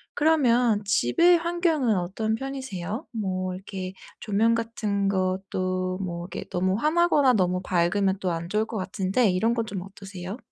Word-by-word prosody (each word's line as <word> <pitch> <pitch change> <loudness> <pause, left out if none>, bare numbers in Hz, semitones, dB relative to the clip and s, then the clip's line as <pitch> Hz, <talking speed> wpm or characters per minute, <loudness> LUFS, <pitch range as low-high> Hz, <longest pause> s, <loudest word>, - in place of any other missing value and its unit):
그러면 245 -8 +3
집의 340 - +4
환경은 330 - +1
어떤 215 +5 -1
편이세요? 260 - -5
뭐 185 -4 -2
이렇게 190 -1 -6 0.3
조명 220 +2 +2
같은 215 -3 -1
것도 185 -1 -1
뭐 175 -2 -4
이렇게 - - -6
너무 185 +2 0
환하거나 300 -1 +3
너무 180 -3 +1
밝으면 190 +2 +1
또 185 - -1
안 165 0 -3
좋을 215 +2 +1
것 220 - -5
같은데 190 +4 +1
이런 225 +6 +1
건 230 -1 -1
좀 195 -3 -5
어떠세요? 195 +1 -8
200 Hz, 315 characters per minute, -25 LUFS, 185-235 Hz, 0.3 s, 집의